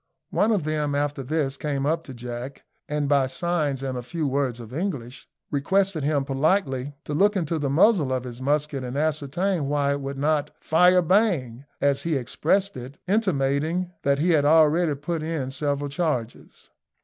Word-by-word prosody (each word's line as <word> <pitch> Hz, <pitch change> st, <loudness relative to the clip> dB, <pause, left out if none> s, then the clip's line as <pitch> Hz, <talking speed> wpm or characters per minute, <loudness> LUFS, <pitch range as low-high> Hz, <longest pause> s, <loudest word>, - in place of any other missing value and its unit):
One 220 Hz, -, +2 dB
of 205 Hz, -7 st, +1 dB
them 150 Hz, -1 st, -1 dB
after 145 Hz, -1 st, -1 dB
this 140 Hz, 0 st, -1 dB
came 140 Hz, -2 st, -2 dB
up 165 Hz, +2 st, 0 dB
to 135 Hz, -, -8 dB
Jack, 120 Hz, +3 st, -7 dB, 0.3 s
and, 150 Hz, -1 st, -1 dB
by 140 Hz, -2 st, +3 dB
signs 145 Hz, -1 st, -1 dB
and 130 Hz, -1 st, -3 dB
a 125 Hz, -, -3 dB
few 155 Hz, +6 st, -4 dB
words 135 Hz, -3 st, -1 dB
of 115 Hz, 0 st, -10 dB
English, 140 Hz, -7 st, -4 dB, 0.2 s
requested 185 Hz, +3 st, +1 dB
him 145 Hz, -1 st, +1 dB
politely 140 Hz, -1 st, 0 dB
to 150 Hz, -, -4 dB
look 205 Hz, +7 st, +3 dB
into 165 Hz, -3 st, -1 dB
the 145 Hz, -2 st, -1 dB
muzzle 160 Hz, -, +4 dB
of 130 Hz, -1 st, -1 dB
his 125 Hz, 0 st, -8 dB
musket 145 Hz, 0 st, 0 dB
and 125 Hz, +2 st, -4 dB
ascertain 155 Hz, +3 st, 0 dB
why 145 Hz, -1 st, +1 dB
it 140 Hz, 0 st, -2 dB
would 135 Hz, 0 st, -5 dB
not 150 Hz, +1 st, 0 dB
"fire! 180 Hz, +3 st, +4 dB
bang!" 155 Hz, -, +1 dB, 0.2 s
as 140 Hz, -1 st, +2 dB
he 165 Hz, -2 st, -1 dB
expressed 185 Hz, +9 st, 0 dB
it, 130 Hz, +3 st, -8 dB
intimating 175 Hz, -3 st, 0 dB
that 140 Hz, 0 st, +2 dB
he 170 Hz, +5 st, +2 dB
had 155 Hz, -3 st, +4 dB
already 155 Hz, +1 st, +4 dB
put 155 Hz, +4 st, -3 dB
in 155 Hz, -5 st, -3 dB
several 145 Hz, 0 st, -1 dB
charges. 140 Hz, -6 st, -4 dB
145 Hz, 175 wpm, -25 LUFS, 135-165 Hz, 0.3 s, muzzle